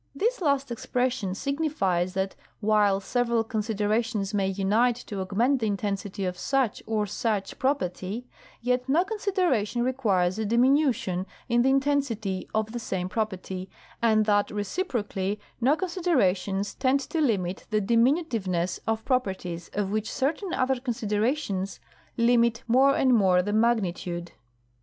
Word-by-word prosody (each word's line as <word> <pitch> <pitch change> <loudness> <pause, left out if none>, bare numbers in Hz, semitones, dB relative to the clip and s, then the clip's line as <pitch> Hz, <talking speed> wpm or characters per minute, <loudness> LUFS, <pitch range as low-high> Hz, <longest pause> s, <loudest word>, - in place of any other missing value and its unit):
This 455 - 0
last 280 -5 +1
expression 240 -4 -1
signifies 200 - -1
that 190 0 -1 0.2
while 210 -2 +3
several 235 +2 0
considerations 215 -1 -1
may 195 -2 +1
unite 205 +5 +2
to 210 -5 -6
augment 230 +9 +1
the 225 - 0
intensity 200 -1 -2
of 180 -1 -3
such 265 -5 0
or 215 -1 0
such 210 -1 -2
property, 230 -4 -1 0.4
yet 250 +1 0
no 320 +6 +4
con 425 +2 -5
sideration 295 - +1
requires 210 -8 +1
a 220 - -1
diminution 240 - +2 0.2
in 240 -1 +3
the 260 - +3
intensity 265 -9 0
of 220 0 -1
the 240 - -4
same 185 -5 -3
property, 190 -3 -3 0.3
and 220 -2 +4
that 205 -1 +2
reciprocally 205 - -2 0.2
no 270 +6 +4
considerations 205 - 0
tend 270 +1 +1
to 320 +3 -2
limit 195 -9 0
the 215 -1 +2
diminutive 235 - +2
ness 175 0 -1
of 225 0 -1
properties 190 -9 -2
of 200 -1 -1
which 215 +2 -1
certain 320 +8 -1
other 260 -3 +1
considerations 215 -3 -1 0.4
limit 235 -1 +3
more 265 +4 +5
and 260 -2 +3
more 185 -5 +4
the 205 +2 -2
magnitude. 180 -6 0
220 Hz, 140 wpm, -26 LUFS, 195-260 Hz, 0.4 s, more